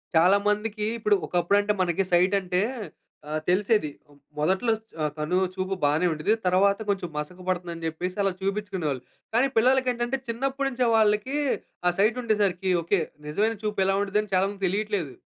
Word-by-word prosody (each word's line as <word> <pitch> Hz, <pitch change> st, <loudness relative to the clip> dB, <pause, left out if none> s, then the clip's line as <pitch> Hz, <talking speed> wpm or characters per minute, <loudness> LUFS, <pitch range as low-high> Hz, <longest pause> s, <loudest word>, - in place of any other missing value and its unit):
చాలా 180 Hz, +5 st, +6 dB
మందికి 210 Hz, 0 st, 0 dB
ఇప్పుడు 210 Hz, -1 st, +3 dB
ఒకప్పుడు 175 Hz, +3 st, +2 dB
అంటే 210 Hz, +1 st, 0 dB
మనకి 175 Hz, +2 st, 0 dB
సైట్ 180 Hz, +3 st, +4 dB
అంటే 180 Hz, 0 st, 0 dB, 0.7 s
ఆహ్, 155 Hz, 0 st, -2 dB
తెలిసేది. 200 Hz, -2 st, +2 dB, 0.5 s
మొదట్లో 190 Hz, +10 st, +1 dB
చ్ 220 Hz, +1 st, -26 dB
ఆహ్, 150 Hz, -1 st, 0 dB
కను 155 Hz, +4 st, 0 dB, 0.2 s
చూపు 190 Hz, +1 st, -2 dB
బానే 150 Hz, +5 st, +3 dB
ఉండేది. 155 Hz, +8 st, +1 dB
తర్వాత 200 Hz, +3 st, +3 dB
కొంచెం 190 Hz, -4 st, -1 dB
మసక 150 Hz, +5 st, -5 dB
పడుతుందని 170 Hz, -2 st, -3 dB
జెప్పేసి, 180 Hz, +3 st, -3 dB
అలా 195 Hz, -1 st, +2 dB
చూపించుకునేవాళ్ళు. 190 Hz, -9 st, -2 dB, 0.3 s
కానీ 250 Hz, +4 st, +4 dB
పిల్లలకి 255 Hz, +2 st, +4 dB
ఏంటంటే, 240 Hz, +2 st, -1 dB
చిన్నప్పటి 270 Hz, +4 st, -1 dB
నుంచే 250 Hz, -2 st, 0 dB
వాళ్ళకీ 215 Hz, +5 st, +2 dB, 0.5 s
ఆ -, -, +2 dB
సైట్ 215 Hz, +4 st, +3 dB
ఉండేసరికి 200 Hz, -5 st, +1 dB
ఓకే. 175 Hz, +3 st, +1 dB, 0.3 s
నిజమైన 210 Hz, +8 st, 0 dB
చూపు 210 Hz, -2 st, -1 dB
ఎలా 195 Hz, 0 st, +2 dB
ఉంటదని 205 Hz, +1 st, -1 dB
చాలా 185 Hz, +1 st, +4 dB
మందికి 200 Hz, -1 st, -3 dB
తెలీట్లేదు. 200 Hz, -7 st, -2 dB
195 Hz, 160 wpm, -26 LUFS, 180-215 Hz, 0.7 s, చాలా